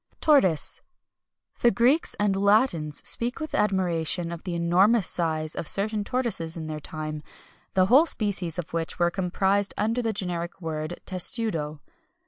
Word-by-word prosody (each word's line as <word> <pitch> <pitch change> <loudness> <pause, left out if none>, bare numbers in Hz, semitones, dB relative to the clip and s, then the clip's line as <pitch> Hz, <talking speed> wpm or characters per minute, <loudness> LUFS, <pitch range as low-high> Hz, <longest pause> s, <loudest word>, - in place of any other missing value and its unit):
TORTOISE. 195 - +3 0.8
The 240 - +4
Greeks 250 +7 +2
and 205 -1 +1
Latins 195 - +2
speak 240 +4 0
with 310 -1 -6
admiration 175 -4 0
of 170 +1 -8
the 175 -2 -3
enormous 185 +6 +3
size 155 -2 0
of 160 - -5
certain 210 +1 +2
tortoises 200 -9 -3
in 160 - -6
their 155 -1 -5
time, 155 0 -6 0.5
the 185 -1 +4
whole 270 - +5
species 195 - -1
of 175 -2 -6
which 165 -1 -3
were 175 -1 +2
comprised 195 +2 0
under 225 +4 0
the 225 -2 -1
generic 180 -4 -4
word 160 0 -5
testudo. 180 - -1
185 Hz, 145 wpm, -25 LUFS, 165-215 Hz, 0.8 s, whole